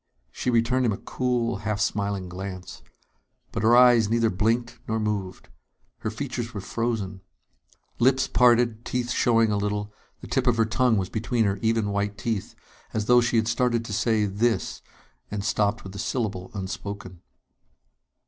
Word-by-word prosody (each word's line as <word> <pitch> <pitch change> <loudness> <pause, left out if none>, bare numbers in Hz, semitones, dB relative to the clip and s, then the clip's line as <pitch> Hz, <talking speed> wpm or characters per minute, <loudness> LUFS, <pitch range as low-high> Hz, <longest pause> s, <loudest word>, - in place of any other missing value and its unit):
She 125 - -3
returned 120 +2 +2
him - - +2
a - - -4
cool, 120 -2 -1
half 105 0 -3
smiling 100 -3 -1
glance. 95 0 -7 0.7
But - - -3
her 115 +2 +5
eyes 120 -4 +6
neither 115 -1 +2
blinked 115 +5 0
nor 110 0 0
moved. 100 -4 -3 0.5
Her - - -3
features 120 -1 -5
were 100 - -3
frozen. 100 -3 -3 0.8
Lips 130 +2 +3
parted, 120 -2 +3
teeth 120 0 -2
showing 115 -3 +3
a 105 - +1
little, 105 +1 -2 0.3
the - - -10
tip - - 0
of 120 -2 +3
her 115 - +4
tongue 115 +1 +2
was 95 -1 -1
between 115 +1 0
her 100 0 0
even 110 -2 +1
white 100 0 -1
teeth 110 0 -3 0.4
as 110 -1 0
though 125 +1 +6
she 120 0 0
had 110 -1 +2
started 120 0 +1
to 105 - -5
say 110 0 +2
"this" 110 +4 -1 0.5
and 100 -1 -4
stopped 105 +1 +1
with 95 - -9
the 100 - -7
syllable 100 -6 -2
unspoken. 95 -1 -6
110 Hz, 165 wpm, -25 LUFS, 100-120 Hz, 0.8 s, eyes